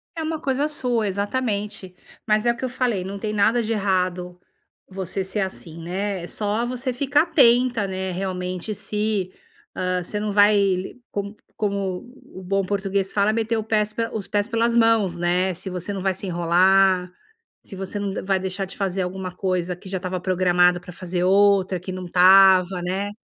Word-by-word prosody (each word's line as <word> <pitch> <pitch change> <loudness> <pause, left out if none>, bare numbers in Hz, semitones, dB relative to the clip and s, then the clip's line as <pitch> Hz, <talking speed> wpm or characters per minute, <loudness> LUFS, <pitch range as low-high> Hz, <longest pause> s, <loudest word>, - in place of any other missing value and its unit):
É 320 - -3
uma 315 0 -3
coisa 275 +2 0
sua 245 -7 -1
exatamente, 205 -2 -2 0.3
mas 215 +1 +2
é 235 - +4
o 235 - -6
que 260 - -3
eu - - -3
falei, 245 -6 -1
não 195 +2 -6
tem 215 +1 -3
nada 225 +3 +3
de 225 +1 -1
errado 180 -3 -1 0.5
você 190 0 -2
ser 190 +2 -2
assim, 170 -3 -5
né, 190 +1 -3
é - - -6
só 210 +4 -1
você 250 +1 -2
ficar 285 +4 +2
atenta, 245 - +3
né, 190 0 -3
realmente 185 +1 -4
se, 210 -2 -2 0.4
hã, 180 0 -1
você 210 +4 -1
não 210 0 -2
vai 200 -2 +3 0.2
como 200 +1 -4 0.2
como 200 -3 -2 0.3
o 185 - -8
bom 195 +2 0
português 195 0 -1
fala 210 +1 +2
meter 225 0 0
o 220 - -2
pés 215 -1 0 0.2
os 210 -3 -4
pés 205 +1 0
pelas 230 0 +1
mãos, 225 -6 +3
né, 180 +2 +1
se 185 +3 -5
você 180 +2 -4
não 195 -1 -4
vai 190 0 +1
se 190 - -6
enrolar, 180 +1 +3 0.5
se 195 - -8
você 195 +2 -5
não 200 -1 -3
vai 195 -1 +1
deixar 190 +1 -3
de 190 - -12
fazer 195 -2 -1
alguma 185 0 -4
coisa 180 -1 -2
que 185 +2 -12
já 190 - -2
estava 185 0 -4
programada 180 -1 +3
pra 180 0 -12
fazer 180 0 -3
outra 195 -1 +3
que 185 - -6
não 185 0 -6
estava, 185 0 +6
né. 190 +3 -2
195 Hz, 185 wpm, -23 LUFS, 185-215 Hz, 0.5 s, estava